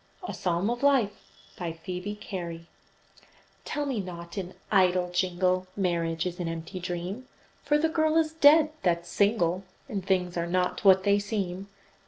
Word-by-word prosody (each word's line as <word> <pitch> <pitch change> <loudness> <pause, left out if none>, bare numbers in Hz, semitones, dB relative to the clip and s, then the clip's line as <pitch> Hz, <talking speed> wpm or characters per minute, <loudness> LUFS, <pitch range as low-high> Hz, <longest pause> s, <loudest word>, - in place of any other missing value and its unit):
A - - -4
PSALM 175 +1 0
OF 240 - -3
LIFE 260 -8 +1 0.3
BY 170 -2 -3
PHOEBE 180 +5 -6
CARY 170 -4 -6 1.0
Tell 295 -1 -2
me 265 -6 -1
not, 170 -2 -7
in 185 -2 -5 0.2
idle 180 -3 +3
jingle, 185 0 +1
Marriage 170 -3 0
is 180 0 -4
an 175 - -2
empty 165 +3 -5
dream, 180 +7 -5 0.4
For 295 +1 +3
the 315 +2 +2
girl 315 0 +2
is 315 -1 +2
dead 310 0 +6
that's 170 -1 0
single, 195 -3 +2 0.2
And 205 -7 -4
things 180 -2 0
are 170 0 -1
not 180 +3 0
what 190 -1 +6
they 200 0 +4
seem. 200 -2 -3
185 Hz, 160 wpm, -28 LUFS, 175-210 Hz, 1.0 s, dead